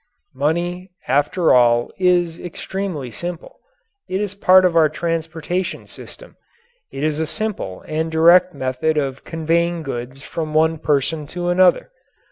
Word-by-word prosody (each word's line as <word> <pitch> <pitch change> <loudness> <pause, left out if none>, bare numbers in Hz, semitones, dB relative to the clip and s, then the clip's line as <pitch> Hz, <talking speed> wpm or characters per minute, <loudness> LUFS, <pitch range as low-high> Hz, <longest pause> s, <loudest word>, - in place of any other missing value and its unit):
Money, 175 +6 -2 0.2
after 145 +6 +2
all, 120 -1 +4
is 175 -2 +2
extremely 175 -6 -5
simple. 175 +7 -7 0.5
It 190 - -1
is 205 -2 -3
a - - -26
part 185 -1 +6
of 175 -2 +1
our 160 -2 +5
transportation 165 +2 -3
system. - - -11 0.5
It 135 - -5
is 155 0 0
a 160 - -1
simple 200 - -4
and 160 +1 -2
direct 175 +3 +5
method 130 +5 -1
of 135 -2 -2
conveying 165 +1 -1
goods 130 0 -6
from 155 -1 -5
one 160 0 +3
person 150 0 0
to 175 +2 -3
another. 180 - +3
160 Hz, 140 wpm, -20 LUFS, 145-180 Hz, 0.5 s, part